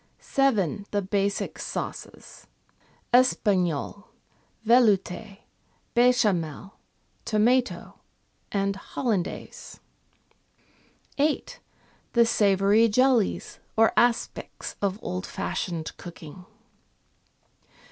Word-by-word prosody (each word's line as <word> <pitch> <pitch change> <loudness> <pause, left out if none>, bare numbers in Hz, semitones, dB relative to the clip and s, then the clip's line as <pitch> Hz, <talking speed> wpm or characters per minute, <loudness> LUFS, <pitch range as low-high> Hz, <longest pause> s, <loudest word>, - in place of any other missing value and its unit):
7. 210 - 0
The 205 -1 -1
basic 200 +1 -1
sauces: - - -7 0.7
Espagnole, 200 - +2 0.6
Veloute, 215 -3 +2 0.5
Bechamel, 205 -8 +1 0.5
Tomato, 240 +4 0 0.5
and 200 -1 0
Hollandaise. 200 -3 -4 1.4
8. 295 +1 0 0.5
The 235 -1 +5
savoury 205 +1 +3
jellies 250 -1 +1 0.2
or 225 0 +4
aspics 240 -1 0
of 200 -1 0
old 185 +1 -4
fashioned 165 -4 -4
cooking. 175 +1 -11
205 Hz, 65 wpm, -26 LUFS, 190-235 Hz, 1.4 s, The